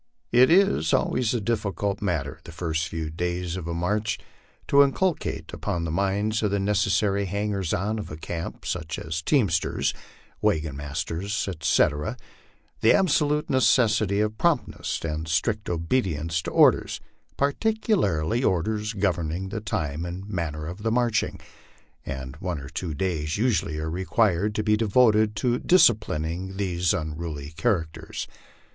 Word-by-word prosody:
It 125 +2 +6
is 170 - +4
always 125 -1 +1
a - - +1
difficult 100 -2 -1
matter, 80 -6 -2
the - - -10
first 80 -1 -2
few 80 -1 -4
days 90 +1 -2
of 90 -3 -5
a 85 - -2
march, 105 +5 0 0.5
to 140 - +6
inculcate 155 +5 0
upon 85 -1 -2
the 80 - -2
minds 100 +4 0
of 105 - +1
the 100 0 0
necessary 100 0 +1
hangers 100 -2 -2
on 105 +4 -1
of 105 - -6
a 75 - -7
camp, 85 +1 -6
such 80 -3 -3
as 80 0 -4
teamsters, 95 - +1 0.5
wagon 75 -3 +1
masters, 80 +9 -3
etc., 75 -4 +1 0.6
the 110 - +5
absolute 150 -5 +2
necessity 110 -5 +3
of 105 0 -2
promptness - - 0
and 80 0 -3
strict 105 +7 0
obedience 85 - 0
to - - -4
orders, - - +4 0.4
particularly 140 - +1
orders 105 +4 0
governing 90 -2 -1
the 105 +1 -4
time 80 -6 -2
and 90 +3 -6
manner 80 -6 -3
of 90 +6 -7
marching; 120 -1 +1 0.6
and 65 0 -6
one 90 0 -3
or 70 0 -8
two 80 -1 -4
days 80 -2 -1
usually 100 -9 +1
are 80 +1 -3
required 100 +2 +1
to 105 - 0
be 105 0 +3
devoted 110 -1 +3
to 120 +3 +1
disci 180 -9 +6
plining 90 +2 -4
these 90 -3 0
unruly 75 -2 -4
characters. 80 -3 -2
95 Hz, 140 wpm, -25 LUFS, 80-110 Hz, 0.6 s, It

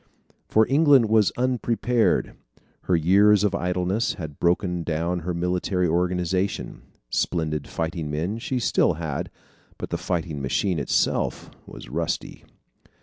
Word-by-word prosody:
For 110 0 +4
England 140 -4 +5
was 110 -3 +4
unprepared. 120 -1 +1 0.5
Her 90 - +2
years 100 +5 +4
of 105 -2 +1
idleness 90 +3 -1
had 80 -6 -8
broken 90 0 +1
down 85 +2 -1
her 90 +2 -3
military 90 +1 0
organization. 90 +3 -1 0.3
Splendid 80 -4 -1
fighting 80 -1 -3
men 85 +9 -2
she 130 +1 -2
still 115 - +2
had, 80 -3 -4 0.5
but - - -6
the - - -2
fighting 80 -5 -3
machine 85 +6 0
itself 70 - 0 0.2
was - - -10
rusty. 80 +6 -4
90 Hz, 125 wpm, -24 LUFS, 80-105 Hz, 0.5 s, England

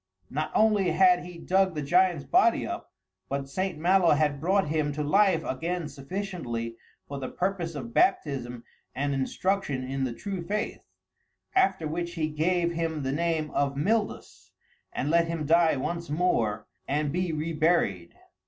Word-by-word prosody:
Not 155 +3 -2
only 210 -4 +4
had 180 0 +5
he 180 -1 -9
dug 185 +1 +1
the 150 - -2
giant's 175 0 +3
body - - +3
up, - - -6 0.4
but 140 0 -2
St. 185 +4 -2
Malo 175 0 +4
had 145 -2 0
brought 190 0 +2
him 155 -1 0
to 150 +1 -2
life 185 +1 +3
again 165 +4 -3
sufficiently 135 - -5 0.3
for 140 -1 -5
the 130 - -4
purpose 180 -3 -2
of 120 -5 -6
baptism 125 -10 +1 0.3
and 140 +2 -1
instruction 140 +1 -1
in 135 +1 -3
the 125 -2 -1
true 195 - -5
faith; 210 +6 -3 0.7
after 375 - +2
which 170 +2 -4
he 155 -2 -1
gave 170 +3 +1
him 165 -3 -2
the 135 - -1
name 160 0 -1
of 140 -1 0
Mildus, 210 +8 -2 0.4
and 145 +4 -2
let 170 0 +4
him 165 -2 -3
die 165 +1 +4
once 170 +5 -3
more 145 -10 0 0.2
and 145 +1 0
be 180 +1 -1
reburied. 155 - 0
160 Hz, 155 wpm, -27 LUFS, 140-180 Hz, 0.7 s, had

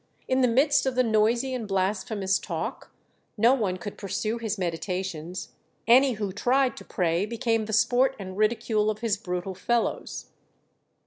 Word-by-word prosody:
In 260 0 +2
the 250 - +5
midst 275 +4 +3
of 260 - -1
the 255 - +4
noisy 230 +3 +2
and 235 -4 -4
blasphemous 195 0 0
talk - - -5 0.5
no 230 +4 +5
one 205 -8 0
could 205 +2 -8
pursue 215 +3 -2
his 220 -2 -2
meditations; 180 0 -4 0.4
any 255 +3 +6
who 205 -3 -3
tried 250 +6 +1
to - - -9
pray 175 0 0
became 230 -1 0
the 220 - -6
sport 255 +5 +3
and 185 -2 -7
ridicule 215 0 +1
of 215 +1 -3
his 225 -4 +1
brutal 180 -2 -4
fellows. 235 +5 -2
215 Hz, 155 wpm, -26 LUFS, 190-240 Hz, 0.5 s, any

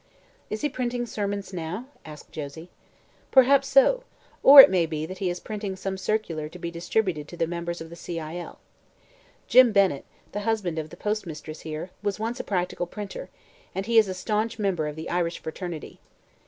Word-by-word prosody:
"Is 215 - -4
he 295 - +1
printing 245 -2 -2
sermons 200 -3 -4
now?" 180 +7 -4 0.2
asked 150 -1 -11
Josie. 160 +3 -8 0.6
"Perhaps 275 +1 +5
so; - - +5 0.4
or 280 +1 +11
it 270 - +12
may 175 -3 +2
be 155 -1 -3
he 185 +2 -3
is 175 0 -3
printing 205 -2 -5
some 190 +1 -4
circular 190 -6 -2
to 180 - -11
be 170 -1 -5
distributed 170 -2 -1
to 175 - -10
the 165 - +1
members 170 0 -4
of 165 0 -9
the - - -8
C. 170 0 -5
I. 155 +1 -6
L. 175 - -8 0.9
Jim 255 -2 +7
Bennett, 195 -9 +2 0.3
the 205 - -3
husband 205 -6 -1
of 155 0 -5
the - - -12
postmistress 165 -7 -4
here, 160 +3 -6
was 205 0 -2
once 230 +2 -3
a - - -3
practical 180 -2 -2
printer, 200 -1 -7 0.5
and 195 +1 -2
he 230 0 +5
is 215 - +3
a 185 - -4
staunch 215 +4 -1
member 190 -7 0
of 150 - -5
the 160 +1 -6
Irish 170 -1 -1
fraternity. 165 0 -7
185 Hz, 190 wpm, -26 LUFS, 165-215 Hz, 0.9 s, it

